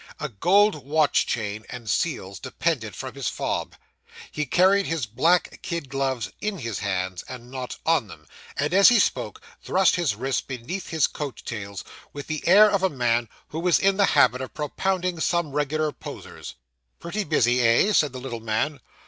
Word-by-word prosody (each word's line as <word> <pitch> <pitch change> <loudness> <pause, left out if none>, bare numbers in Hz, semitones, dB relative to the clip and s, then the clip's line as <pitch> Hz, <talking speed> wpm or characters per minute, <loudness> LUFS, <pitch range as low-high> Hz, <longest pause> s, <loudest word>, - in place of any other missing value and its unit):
A - - -3
gold 180 - +3
watch 150 0 +2
chain, 105 -1 -3
and 125 -3 -8
seals, 100 - -2
depended 130 -4 -2
from 130 -3 -6
his 135 -3 -4
fob. - - -3 0.6
He 150 -1 -3
carried 190 +6 +4
his 160 -6 -1
black 160 +12 +1
kid 170 -6 -4
gloves 135 -3 -2
in 210 -2 -2
his 115 - -4
hands, 95 -3 -2
and 125 -1 -9
not 130 -1 -6
ON 160 -8 +2
them; 80 -4 -13 0.3
and 145 +4 0
as 195 +1 +8
he 240 - +5
spoke, 430 - 0 0.2
thrust 190 0 +2
his 165 -11 0
wrists 130 +4 -1
beneath 135 +9 -6
his 160 -4 +2
coat 145 -4 -6
tails, 100 -4 -6 0.3
with 145 -1 -7
the 155 -1 -4
air 205 +4 +8
of 200 -2 +1
a 190 - +2
man 120 -5 0 0.2
who 160 - -5
was 175 0 +3
in 195 0 +2
the 200 - +5
habit 125 +1 +4
of 130 - -7
propounding 180 +3 -1
some 170 -2 0
regular 150 +2 0
posers. - - -9 0.4
'Pretty 205 +5 -3
busy, 125 - +2
eh?' 120 - +4
said 150 -7 +3
the 130 - -7
little 125 -3 -6
man. 115 +6 -1
140 Hz, 180 wpm, -24 LUFS, 120-175 Hz, 0.6 s, as